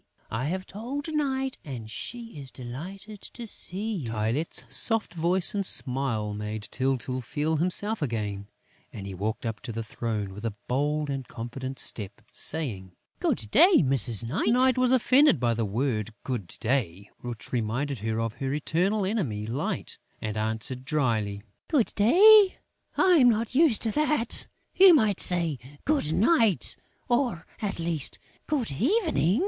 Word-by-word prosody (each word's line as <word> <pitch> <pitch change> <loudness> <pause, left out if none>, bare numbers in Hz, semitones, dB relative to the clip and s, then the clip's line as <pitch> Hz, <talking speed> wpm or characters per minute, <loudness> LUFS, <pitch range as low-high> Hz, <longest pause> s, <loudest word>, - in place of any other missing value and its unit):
I 115 +4 -2
have 185 +5 -3
told 275 - -6
Night; 270 -3 -1
and 125 -7 -7
she 230 - -7
is 135 -2 -5
delighted 185 - -9
to 235 - -9
see 210 0 -2
you." 130 -9 -5
Tylette's 115 +8 -1
soft 225 -4 +2
voice 175 +2 +2
and 200 -1 -1
smile 125 - +1
made 105 +1 -5
Tyltyl 130 -1 -1
feel 150 +6 -1
himself 195 +6 +2
again; 105 -7 -3 0.4
and 100 - -8
he 100 - -6
walked 105 +5 -3
up 115 -1 -3
to - - -7
the 115 0 -4
throne 110 -3 -4
with 105 +3 -10
a 115 -3 -3
bold 145 +3 0
and 135 -2 -4
confident 130 +3 -6
step, 100 -2 -2
saying: 105 - +1 0.3
"Good 105 -2 -1
day, 355 - +6
Mrs. 120 -4 +1
Night!" 145 - -1
Night 255 +2 +4
was 255 -1 +2
offended 260 - +4
by 120 -1 +1
the 115 -1 -1
word, 110 0 -2
"Good 120 -9 -4
day," 105 -6 -2
which 120 -3 -8
reminded 125 +3 -2
her 110 +1 -2
of 115 -1 -2
her 135 +2 -4
eternal 180 +8 0
enemy 150 - -2
Light, 120 +6 -4 0.2
and 110 -1 -4
answered 110 +4 -1
drily: 115 - -1 0.2
"Good 275 -8 +1
day?... 390 - +6 0.4
I 365 -2 +5
am 250 -2 +6
not 230 +1 0
used 280 -5 +3
to 225 - +1
that!... 300 -3 0 0.3
You 375 -2 +8
might 215 - +2
say, 170 -6 +2 0.3
Good 285 - +1
night, 225 - +2 0.3
or, 240 -9 0 0.2
at 205 -2 -2
least, 165 -4 -1 0.3
Good 275 - -1
evening!" 245 - +1
145 Hz, 155 wpm, -27 LUFS, -, 0.4 s, You